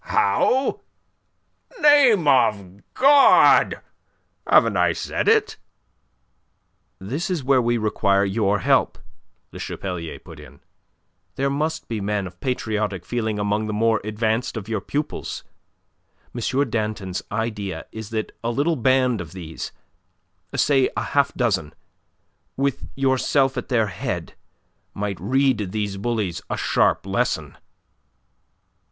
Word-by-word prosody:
"How? 265 +2 +1 1.0
Name 265 - +5
of 100 -8 +2
God! 280 +1 +6 0.7
Haven't - - +4
I - - +3
said - - -3
it?" 435 -1 +3 1.4
"That 135 - -4
is 175 -7 -2
where 130 -1 +3
we 120 0 +1
require 100 -2 +1
your 100 0 0
help," - - +2 0.5
Le - - -10
Chapelier 90 -4 -5
put - - -13
in. - - -14 0.8
"There 140 0 0
must 155 +3 -2
be 110 -3 -3
men 100 0 -1
of 90 -1 -11
patriotic 105 -7 -2
feeling 110 -2 -2
among 105 +1 -1
the 105 - -3
more 110 +1 +1
advanced 110 +3 -1
of 105 -2 -6
your 110 -3 -2
pupils. 145 +8 -4 0.9
M. 130 +4 0
Danton's 105 -4 -3
idea 105 -3 -3
is 110 -2 -8
that 110 -1 -4
a 115 - -1
little 145 +7 +1
band 130 -3 +2
of 85 0 -10
these 85 -4 -7 0.8
say 135 -3 +3
a - - 0
half 140 -1 +1
dozen, 95 - -1 0.8
with 140 0 -1
yourself 135 0 +1
at - - -5
their 115 -4 +2
head 95 -4 -5 0.6
might 100 -1 -3
read 130 -2 +1
these 105 -2 -3
bullies 105 -4 -2
a - - -2
sharp - - +1
lesson." - - -1
110 Hz, 120 wpm, -22 LUFS, 100-135 Hz, 1.4 s, God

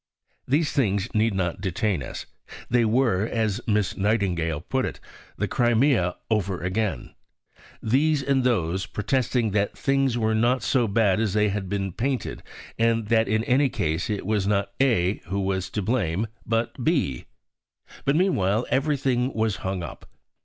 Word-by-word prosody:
These 145 +4 +2
things 100 -4 0
need 110 -1 +2
not 90 -3 -2
detain 95 -2 -1
us. 60 - -6 0.5
They 120 -1 +4
were, 110 -3 +2
as 110 -1 -1
Miss 105 -3 +1
Nightingale 90 -7 0
put 130 +9 -1
it, - - -4 0.4
"the 105 - -1
Crimea 120 -4 +2
over 100 -4 0
again," 95 - -2 0.7
"these 140 +5 +2
and 135 -1 +1
those" 95 -7 0
protesting 120 0 0
that 100 0 0
things 135 -3 +1
were 110 -1 +1
not 120 +4 +2
so 125 -4 +2
bad 100 -2 +2
as 110 -4 0
they 105 0 +3
had 100 -2 -3
been 95 -1 -2
painted, 130 +7 -2 0.4
and 115 -2 +1
that 115 -1 +3
in 110 +2 +1
any 135 +3 +3
case 80 -4 -2
it 105 -3 -2
was 105 -1 0
not 100 -1 0
A 105 -8 +2
who 100 +3 -2
was 95 -1 -1
to 105 - -3
blame, 105 -3 0 0.2
but 115 +2 -1
B. 135 - 0 0.8
But 140 - +2
meanwhile 115 - +2
everything 135 -3 +1
was 110 -2 0
hung 95 -1 -3
up. - - -9
110 Hz, 155 wpm, -25 LUFS, 95-125 Hz, 0.8 s, They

